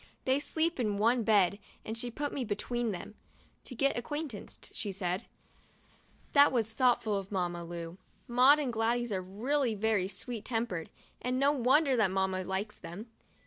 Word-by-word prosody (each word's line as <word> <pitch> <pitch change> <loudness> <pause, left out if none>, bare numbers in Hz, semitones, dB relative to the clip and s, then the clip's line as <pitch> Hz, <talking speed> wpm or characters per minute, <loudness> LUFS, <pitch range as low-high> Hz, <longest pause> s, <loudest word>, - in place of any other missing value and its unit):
They 265 +1 +3
sleep 320 +2 0
in 210 -4 0
one 235 +4 +3
bed 200 -3 +3 0.3
and 220 - -4
she 240 +1 -2
put 285 +5 -3
me 270 - -2
between 235 +2 -2
them, 195 +2 -7 0.5
'to 255 - -8
get 275 +4 +2
acquainted,'* 280 -2 -5
she 205 - -3
said! 185 -1 -3 1.1
That 285 0 +7
was 225 -4 0
thoughtful 240 -4 +2
of 195 0 -6
Mamma 175 -3 -1
Lu. 170 +1 -7 0.3
Maud 255 +4 +6
and 275 -5 -2
Gladys 235 +1 0
are 190 -2 -1
really 230 +6 0
very 210 -3 +1
sweet 210 +3 -6
tempered, 225 -9 -2 0.3
it's 250 - -1
no 275 +2 +4
wonder 270 +1 +3
that 220 -5 +3
Mamma 190 0 0
likes 190 +3 -3
them. 210 +7 -9
225 Hz, 165 wpm, -31 LUFS, 195-255 Hz, 1.1 s, That